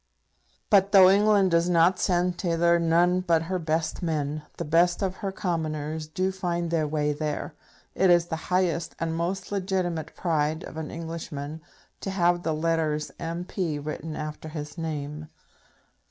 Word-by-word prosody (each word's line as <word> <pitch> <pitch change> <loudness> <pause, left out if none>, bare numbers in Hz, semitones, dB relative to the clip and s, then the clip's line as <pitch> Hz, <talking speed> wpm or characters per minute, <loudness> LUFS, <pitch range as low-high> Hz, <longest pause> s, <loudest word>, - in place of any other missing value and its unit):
But 200 0 +5
though 190 -1 +9
England 200 -2 +4
does 170 +1 +3
not 175 +1 +4
send 180 -1 +1
thither 170 -1 +2
none 170 +2 +3
but 170 -3 +2
her 185 +2 -2
best 160 +1 -1
men, 155 -3 -1 0.2
the 170 - -3
best 170 +5 +3
of 190 -1 -2
her 195 -3 -3
Commoners 155 -4 -3
do 185 +5 -1
find 175 -3 -2
their 160 -2 +1
way 150 0 0
there. 150 +1 -3 0.4
It 190 - +3
is 175 -1 +5
the 170 - -3
highest 180 -2 0
and 165 -1 -2
most 185 +4 -3
legitimate 185 -4 -2
pride 155 -2 0
of - - -9
an 160 -1 -5
Englishman 160 -2 -6 0.4
to - - -4
have 175 -2 +2
the 160 -2 -1
letters 155 -1 0
M.P. 170 -1 -3
written 150 +1 -5
after 155 +1 -6
his 150 -1 -6
name. 155 -2 -5
165 Hz, 155 wpm, -26 LUFS, 155-180 Hz, 0.4 s, though